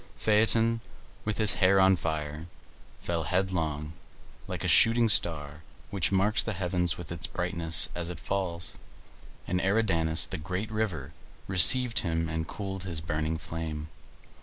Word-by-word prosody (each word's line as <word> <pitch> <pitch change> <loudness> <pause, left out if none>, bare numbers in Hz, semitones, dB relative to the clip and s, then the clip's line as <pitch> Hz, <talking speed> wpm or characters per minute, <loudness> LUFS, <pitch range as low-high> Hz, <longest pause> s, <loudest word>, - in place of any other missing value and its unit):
Phaeton, 115 +2 +2 0.4
with 110 -1 -2
his 110 -2 +5
hair 95 +1 +4
on 95 0 +5
fire, 75 -2 -5 0.6
fell 85 -1 -2
headlong, 80 -3 -2 0.5
like - - -6
a - - -1
shooting 115 +1 +4
star 75 -7 +1 0.3
which 100 -2 0
marks 100 +3 +3
the 110 - -3
heavens 90 -2 -2
with 85 -2 -9
its 85 -1 -4
brightness 85 -3 -1
as 85 -1 -3
it 85 -2 -7
falls, 85 -3 -2 0.7
and 90 +1 -2
Eridanus, 85 -6 +1
the 90 - -7
great 95 +6 -5
river, 90 -10 -3 0.3
received 115 +6 +7
him 80 -2 -2
and 80 0 -4
cooled 95 -2 -6
his 85 -4 -5
burning 80 0 -3
frame. 80 -1 -6
90 Hz, 140 wpm, -28 LUFS, 80-100 Hz, 0.7 s, received